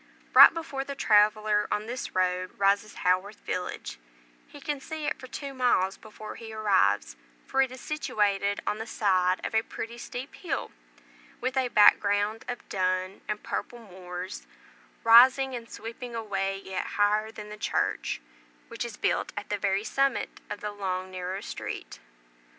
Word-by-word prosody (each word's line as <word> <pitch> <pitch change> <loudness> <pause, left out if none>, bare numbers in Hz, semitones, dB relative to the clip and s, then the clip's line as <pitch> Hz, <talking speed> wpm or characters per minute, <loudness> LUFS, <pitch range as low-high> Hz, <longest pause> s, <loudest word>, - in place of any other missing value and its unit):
Right - - +11
before 320 -5 -4
the 280 0 -6
traveller 210 -2 +3
on 210 - 0
this 245 +2 -5
road 185 0 0
rises 200 +1 +2
Haworth 185 +3 +1
village; 180 - -4 0.5
he 290 - -12
can 285 0 -3
see 315 +1 -5
it 295 - -2
for 255 - -9
two 275 +2 -6
miles 220 -7 +2
before 215 0 -10
he 225 -1 -9
arrives, 195 - +2 0.3
for 270 - +2
it 265 -1 +1
is 255 - -9
situated 205 -9 0
on 210 - -1
the 225 - -5
side 185 -4 +1
of - - -4
a 220 - +4
pretty 230 +1 -7
steep 250 +3 -7
hill, 345 - -4 0.7
with 255 +1 -2
a 260 -1 +2
back 210 -3 +7
ground 205 +2 0
of 245 - -6
dun 185 0 -1
and 210 0 -3
purple 240 - -4
moors, 185 -4 -8 0.6
rising 255 +3 +7
and 230 -1 -7
sweeping 235 +2 -7
away 195 -3 -2
yet 190 -1 -4
higher 210 +1 +3
than 210 -1 -9
the 210 - -7
church, 210 - -1 0.5
which - - -4
is - - -7
built - - 0
at 205 - -5
the 205 - 0
very 195 +1 +1
summit 275 +4 0
of - - -5
the 210 - -3
long 185 -2 -3
narrow 185 +1 -4
street. - - -6
210 Hz, 165 wpm, -28 LUFS, 195-245 Hz, 0.7 s, Right